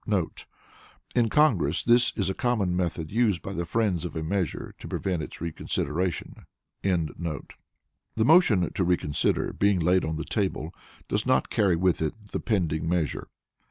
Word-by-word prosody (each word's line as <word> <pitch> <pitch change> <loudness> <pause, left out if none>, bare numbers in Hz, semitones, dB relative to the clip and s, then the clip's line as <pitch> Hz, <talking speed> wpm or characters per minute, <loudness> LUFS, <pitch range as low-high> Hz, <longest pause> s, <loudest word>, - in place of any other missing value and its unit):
[In 115 -2 +3
Congress 95 - +3
this 120 +1 +4
is 100 - 0
a 95 - 0
common 105 -6 0
method 85 -3 -2
used 105 -6 +1
by 95 - -5
the 85 -2 -2
friends 95 -2 0
of 90 - -5
a 80 - -2
measure 90 +2 -2
to - - -8
prevent 90 -4 -2
its - - -8
reconsideration.] 85 +1 -2 0.4
The 85 -3 -1 0.9
motion 110 - +4
to 95 - 0
reconsider 85 -5 +1
being 100 -2 +2
laid 90 +3 +3
on 80 0 -2
the 80 0 -4
table 95 -6 -2 0.3
does - - -1
not - - +2
carry 95 -4 +3
with 90 0 +1
it 80 - -1 0.2
the - - -2
pending 80 -8 0
measure. 85 -4 -1
90 Hz, 155 wpm, -27 LUFS, 80-105 Hz, 0.9 s, this